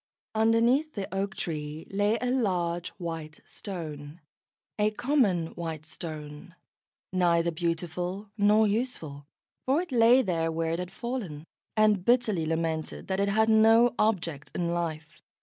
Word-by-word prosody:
Underneath 230 +7 +3
the 200 -2 -3
oak 195 +1 -2
tree 155 -4 -4
lay 205 +3 +2
a 250 0 -1
large 180 -8 0
white 165 -3 -6
Stone, 155 -5 -7 0.6
a 210 0 +4
common 215 - +1
white 160 -3 -5
Stone, 155 +1 -8 0.6
neither 170 -2 +3
beautiful 175 +4 -3
nor 210 +1 +4
useful, 200 - -3 0.4
for 270 +4 +3
it 360 -3 -4
lay 245 +2 +6
there 165 -5 0
where 165 0 -1
it 165 - -1
had 180 0 -5
fallen, 200 - -5 0.3
and 215 -3 +4
bitterly 215 -8 +2
lamented 160 +1 -2
that 190 0 0
it 200 0 +2
had 220 +2 +3
no 225 +2 +5
object 170 -9 0
in 170 -1 -1
life. 160 -2 -4
180 Hz, 135 wpm, -28 LUFS, 165-220 Hz, 0.6 s, lay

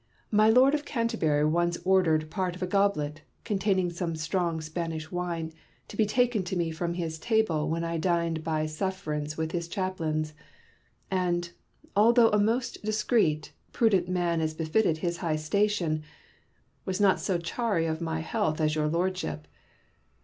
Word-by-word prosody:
My 215 0 +5
Lord 255 +5 +6
of 295 -1 0
Canterbury 225 - 0
once 170 +2 +1
ordered 160 -5 +3
part 180 0 -1
of 185 - -5
a - - +2
goblet, 180 -6 0 0.2
containing 195 -4 +1
some 170 -1 -3
strong 165 +1 -1
Spanish 160 0 -4
wine, 170 -3 -3 0.4
to - - -9
be 215 0 +2
taken 245 -1 +2
to 185 +1 -3
me 170 -2 0
from 170 +1 -3
his 165 -2 -3
table 170 -8 +1
when 165 +1 -1
I 165 0 -2
dined 170 -2 0
by 155 -1 0
sufferance 155 -3 -3
with 160 0 -2
his 170 -1 -2
chaplains, 165 -5 -2 0.8
and, 175 -2 0 0.4
although 230 +3 +6
a 210 - +3
most 235 +4 0
discreet, 215 -7 +1 0.2
prudent 195 -6 +2
man 175 -2 +1
as 155 0 -1
befitteth 160 +2 +1
his 170 +1 -2
high 165 -3 -1
station, 165 0 0 0.8
was 190 +1 -3
not 200 -2 +4
so 190 -3 0
chary 170 +1 -1
of 160 0 -2
my 160 -1 -2
health 160 -3 -1
as 155 -1 +2
your 155 -1 +1
Lordship. 160 - -2
170 Hz, 155 wpm, -28 LUFS, 160-200 Hz, 0.8 s, Lord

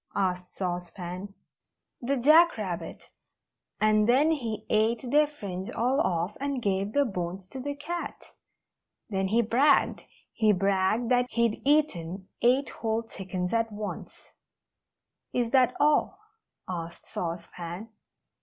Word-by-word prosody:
asked 180 -1 -1
Sauce 175 -2 -3
Pan. 180 +3 -7 0.7
"The 270 +3 0
Jack 315 +6 +6
Rabbit 175 -6 -5 0.7
and 215 +1 +3
then 285 +6 +5
he 235 -8 -3
ate 220 +3 +1
their 300 +1 +5
fringe 195 -10 -6
all 255 +5 +1
off, 175 - -1
and 280 -1 -2
gave 200 -1 -1
the 285 0 +3
bones 185 -3 -4
to 265 - -7
the 285 +2 -4
cat. 345 +4 -6 0.8
Then 190 -1 0
he 230 +4 +3
bragged 270 +6 +3 0.3
he 215 -2 +3
bragged 195 +4 +1
that 250 0 +3
he'd 235 -3 0
eaten 195 - +1
eight 255 +2 +3
whole 225 0 -2
chickens 185 -4 -4
at 225 -1 +1
once." 210 0 -7 1.0
"Is 240 -2 0
that 255 -2 +4
all?" 300 +5 +3 0.5
asked 170 -2 -6
Sauce 170 0 -4
Pan. 175 +5 -7
215 Hz, 130 wpm, -28 LUFS, 185-255 Hz, 1.0 s, Jack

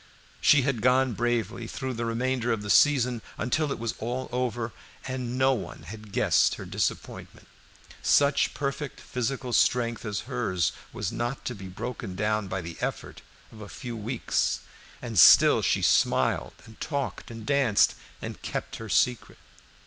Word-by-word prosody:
She 145 -3 +5
had 130 -4 -1
gone 130 +1 +3
bravely 120 0 -1
through 130 +2 -4
the 115 0 -3
remainder 120 +1 -1
of 110 -2 -1
the 105 - -1
season, 125 -5 +4 0.2
until 145 +7 0
all - - -1
was 115 0 -3 0.4
over, 120 -2 -2 0.3
and 130 -1 -4
no 135 0 +4
one 120 - -6
had 110 -1 -10
guessed - - +3
her - - -8
disappointment. - - -4 0.5
Such 140 -1 +3
perfect 140 0 -4
physical 125 0 -3
strength 120 -1 +2
as 105 -3 -3
hers 105 - -1 0.2
was - - -3
not 120 +3 -3
to 125 - -2
be 100 -4 -9
broken 95 +1 -6
down 105 +1 0
by 95 - -3
the 85 -1 -8
effort - - -4 0.3
of 110 - -12
a 105 - -9
few 120 -2 -7
weeks, 115 +3 -1 0.4
and 115 -5 0
still - - +8
she - - +1
smiled - - +2
and 110 -1 -16
talked 140 -3 -3
and 115 -2 -9
danced 135 -6 +3 0.3
and - - -6
kept - - -5
her 115 -1 -8
secret. 125 +4 +1
120 Hz, 155 wpm, -27 LUFS, 110-130 Hz, 0.5 s, still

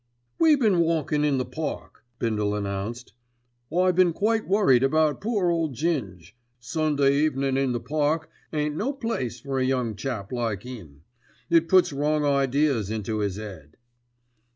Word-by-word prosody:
"We 320 -2 +6
been 215 -10 +2
walkin' 160 -3 +1
in 145 -2 +2
the 130 - -1
Park," 155 -2 -6
Bindle 105 -3 -1
announced. 100 +3 -4 0.6
"I 180 +2 +3
been 180 -1 +3
quite 220 +4 0
worried 190 - +4
about 150 +2 +2
poor 205 -5 +1
old 165 -5 -1
Ging. 120 - -2 0.4
Sunday 140 +2 +1
evenin' 135 -3 +1
in 135 -1 +1
the 120 - -1
Park 155 +4 -1 0.2
ain't 150 -1 -1
no 245 - -1
place 135 - -3
for 135 0 -2
a - - +1
young 125 -4 0
chap 110 -3 -5
like 115 -4 -2
'im. 85 - -10 0.5
It 165 -1 +4
puts 185 -5 +4
wrong 150 +1 0
ideas 140 -5 +1
into 110 0 -2
'is 100 -2 -2
'ead." 90 -9 -10
140 Hz, 155 wpm, -25 LUFS, 115-160 Hz, 0.6 s, We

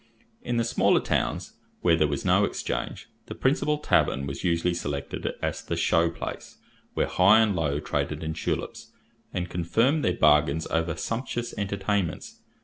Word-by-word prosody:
In 120 - -2
the 115 - +2
smaller 115 - +3
towns, - - -2 0.3
where 85 -2 +4
there 80 -2 +2
was 70 -2 -3
no - - +4
exchange, - - -3 0.2
the - - -7
principal 150 +3 +1
tavern 70 - +1
was 70 0 -5
usually 85 0 +1
selected 70 -4 -4 0.2
as - - -2
the - - -3
"show 85 0 +3
place," 85 - -7 0.4
where - - +2
high 100 +4 +5
and 110 -3 +3
low 75 -4 0
traded 75 - -2
in 80 0 -2
tulips, 80 - -4 0.4
and 90 0 -3
confirmed 115 - +1
their - - +1
bargains 75 0 +4
over 80 0 0
sumptuous 120 0 -3
entertainments. 100 -2 -2
85 Hz, 155 wpm, -26 LUFS, 80-110 Hz, 0.4 s, high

